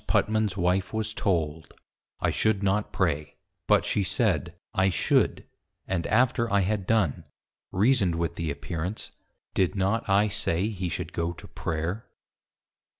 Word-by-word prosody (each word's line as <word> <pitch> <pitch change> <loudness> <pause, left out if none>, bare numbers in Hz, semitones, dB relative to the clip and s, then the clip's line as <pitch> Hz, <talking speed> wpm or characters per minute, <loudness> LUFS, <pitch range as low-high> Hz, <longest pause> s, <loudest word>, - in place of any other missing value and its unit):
Putman's_ 110 -2 +1
wife 90 +2 +1
was 110 0 -1
told, 80 -6 -1 0.5
I - - +2
should 110 -2 +1
not 100 +2 +1
Pray; 75 -6 -1 0.3
but - - +4
she 100 - +1
said, 90 - +1 0.2
I 95 0 +3
should: 90 - +2 0.4
and 85 -3 -2
after 115 0 +2
I 100 0 +4
had 95 0 -1
done, 110 -10 +1 0.5
reasoned 100 -3 +3
with 85 0 -1
the 85 -1 -3
Appearance, 85 +6 -4 0.4
_Did 90 -5 +1
not 100 +4 0
I 100 +2 +4
say 100 -1 0
he 95 -4 -3
should - - -4
go 85 +1 -1
to - - -12
Prayer. 80 +7 -3
95 Hz, 145 wpm, -27 LUFS, 85-105 Hz, 0.5 s, but